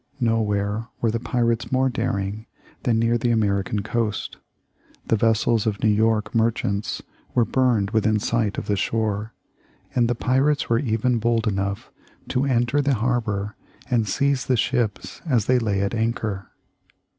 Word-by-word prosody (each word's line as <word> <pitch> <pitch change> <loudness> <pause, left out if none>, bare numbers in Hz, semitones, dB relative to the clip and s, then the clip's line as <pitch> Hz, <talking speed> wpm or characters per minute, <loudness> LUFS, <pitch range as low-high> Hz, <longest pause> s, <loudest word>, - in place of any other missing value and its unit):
Nowhere 110 -2 0
were 115 - +1
the 115 - -1
pirates 115 -1 0
more 130 0 +3
daring 110 -4 -2 0.3
than 120 -4 +1
near 115 +1 +2
the 120 - 0
American 100 -2 +1
coast. 110 -1 -2 0.7
The - - +2
vessels 115 0 +2
of 105 -2 -1
New 110 - +5
York 110 0 +1
merchants 110 -3 0 0.3
were 120 - +4
burned 115 -5 +1
within 110 -1 +2
sight 110 -1 0
of - - -3
shore, 110 0 -1 0.6
and 120 -2 +3
the 120 - +1
pirates 135 +5 +1
were 115 0 +3
even 120 -1 +1
bold 115 0 +1
enough 100 -1 -2 0.4
to 130 +2 +1
enter 125 +1 +2
the 140 -1 +2
harbor 110 -3 -1 0.4
and 115 -3 +2
seize 140 +1 +1
the 130 - +2
ships 120 -2 -1
as 120 -8 +2
they 130 0 +3
lay 105 -4 0
at 100 +2 -1
anchor. 110 -3 -2
115 Hz, 150 wpm, -23 LUFS, 105-120 Hz, 0.7 s, New